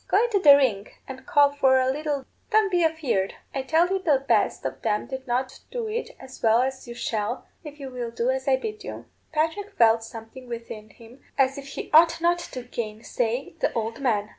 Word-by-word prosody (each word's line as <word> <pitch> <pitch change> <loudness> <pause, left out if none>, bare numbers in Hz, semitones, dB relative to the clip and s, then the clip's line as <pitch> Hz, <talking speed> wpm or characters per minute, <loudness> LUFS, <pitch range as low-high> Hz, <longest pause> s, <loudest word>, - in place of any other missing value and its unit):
Go - - +3
into 460 -4 +1
the 290 -6 +9
ring 220 -8 +1 0.2
and 265 +3 -9
call 290 -5 +5
for 265 -2 +4
a 255 - +2
lilt. 290 -1 -3 0.2
Don't 430 -3 +3
be 350 -1 +3
afeard. 290 -12 0 0.2
I 270 - -1
tell 320 +6 +3
you 385 0 0
the 285 -7 +1
best - - +2
of - - -4
them 210 -2 0
did 265 -1 -7
not 255 +2 -2
do 475 -3 -4
it 450 +2 -4
as 260 0 -12
well 225 +2 +4
as 265 -1 -4
you 235 - -7
shall, 230 0 -3 0.2
if 300 -1 -10
you 270 -2 -7
will 245 -2 -4
do 235 +2 0
as 265 +1 -3
I 270 - +5
bid 425 +10 -5
you.' - - -7 0.3
Patrick 325 +6 -1
felt 225 -1 +5
something 225 +3 -10
within 230 -2 -7
him 235 +4 -16 0.2
as 270 0 +2
if 275 - -10
he 275 - -7
ought 330 +1 +6
not 345 +1 +2
to 255 -7 -7
gainsay 235 +2 -3
the - - +1
old 225 +1 -3
man. 215 -5 +1
265 Hz, 215 wpm, -25 LUFS, 235-315 Hz, 0.3 s, the